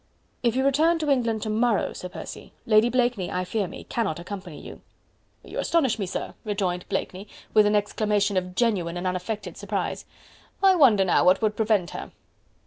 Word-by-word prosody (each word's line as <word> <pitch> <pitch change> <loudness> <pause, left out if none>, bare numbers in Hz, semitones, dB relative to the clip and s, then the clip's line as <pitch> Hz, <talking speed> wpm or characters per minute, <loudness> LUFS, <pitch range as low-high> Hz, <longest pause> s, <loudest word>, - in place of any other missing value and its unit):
"If 235 -1 +1
you 265 +1 +1
return 315 +5 +3
to 305 -3 0
England 230 -5 +1
to 215 - -2
morrow, 225 0 +1
Sir 180 - -7
Percy, 180 - -9
Lady 220 +1 +4
Blakeney, 240 -6 0
I 180 0 -2
fear 200 +1 -1
me, - - -9
cannot 215 -10 -2
accompany 180 -3 -8
you." - - -11 0.6
"You - - -6
astonish 265 -10 +1
me, 195 - -2
sir," 180 - -4
rejoined 190 -4 -2
Blakeney 190 0 -3 0.3
with 215 -1 +6
an 210 - +2
exclamation 205 -1 +1
of 180 0 -2
genuine 180 -8 0
and 175 - -4
unaffected 185 +4 -3
surprise. - - -3 0.6
"I 385 -1 +7
wonder 240 - +5
now 180 - +3
what 185 +4 +4
would 215 -1 +1
prevent 210 -6 +1
her?" - - -7
210 Hz, 180 wpm, -25 LUFS, 185-235 Hz, 0.6 s, I